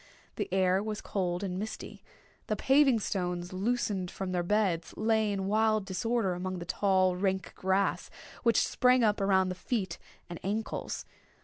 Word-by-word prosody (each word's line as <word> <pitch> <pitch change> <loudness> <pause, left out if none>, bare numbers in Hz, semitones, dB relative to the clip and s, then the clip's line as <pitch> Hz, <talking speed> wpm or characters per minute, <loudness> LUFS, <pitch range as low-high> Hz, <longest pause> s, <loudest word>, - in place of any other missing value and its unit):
The - - -3
air 190 0 +3
was 215 0 -3
cold 180 -1 -2
and 185 -1 -3
misty. 215 +3 -7 0.4
The 215 - 0
paving 265 +2 +4
stones, 180 -2 -2
loosened 200 -2 -1
from 190 0 -5
their 180 -1 0
beds, 180 -3 0
lay 220 -1 +2
in 195 -1 -2
wild 215 0 +2
disorder 195 +1 0
amid 185 +1 -4
the 170 - -6
tall, 185 0 +2
rank 190 +1 -1
grass, 190 +1 0 0.3
which 230 -3 +3
sprang 250 0 +3
up 210 -2 +2
around 190 -1 +3
the - - -2
feet 185 -2 -3 0.3
and 175 - -7
ankles. 215 +3 -3
195 Hz, 155 wpm, -30 LUFS, 185-215 Hz, 0.4 s, paving